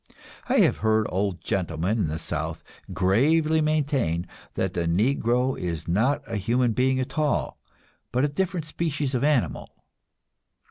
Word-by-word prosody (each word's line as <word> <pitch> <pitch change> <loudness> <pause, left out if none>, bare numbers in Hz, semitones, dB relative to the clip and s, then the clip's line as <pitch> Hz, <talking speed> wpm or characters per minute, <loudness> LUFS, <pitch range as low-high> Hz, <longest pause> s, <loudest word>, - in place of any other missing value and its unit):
I - - +4
have - - +3
heard 110 0 +2
old 95 -1 -1
gentlemen 90 +3 -1
in 95 - +1
the 75 +1 -3
South 80 - -4 0.3
gravely 155 - +3
maintain 140 - 0 0.3
that - - -1
the 85 -1 -1
Negro 120 +7 +1
is 85 -3 -4
not 115 +11 +1
a 115 - -3
human 120 +4 +1
being 130 +2 +2
at 130 +4 -3
all, 150 -1 0 0.5
but 125 +3 +2
a - - +2
different 170 +2 -2
species 150 -3 -2
of 125 - 0
animal. 145 -5 +1
125 Hz, 145 wpm, -25 LUFS, 95-145 Hz, 0.5 s, I